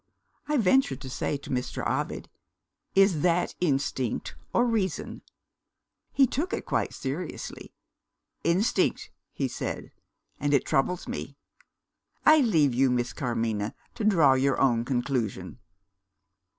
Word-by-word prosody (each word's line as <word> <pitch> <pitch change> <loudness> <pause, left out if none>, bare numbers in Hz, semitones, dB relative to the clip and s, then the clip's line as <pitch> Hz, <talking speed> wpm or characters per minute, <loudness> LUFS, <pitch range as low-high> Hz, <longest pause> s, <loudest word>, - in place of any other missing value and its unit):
I 300 0 +1
ventured 215 - +3
to 130 -2 -7
say 145 - -2
to 140 - -10
Mr. 125 -1 -2
Ovid, - - -2 0.7
'Is 195 -5 +4
that 175 +1 +2
instinct 135 -6 -1 0.2
or 240 - +3
reason?' 215 -7 -1 0.9
He 275 - +5
took 320 - -2
it 450 - -3
quite - - 0
seriously. 150 +6 -6 0.7
'Instinct,' 180 +7 +1 0.2
he - - -2
said - - -5 0.5
'and 145 0 +2
it 135 - +2
troubles 175 +7 0
me.' - - -6 0.9
I 310 0 +8
leave 160 - +3
you, 130 +2 +3
Miss 120 -1 0
Carmina, 115 -3 -2 0.2
to 225 - -5
draw 165 -10 +5
your 135 +1 +1
own 120 -4 +3
conclusion." 120 -6 -2
145 Hz, 125 wpm, -27 LUFS, 125-195 Hz, 0.9 s, I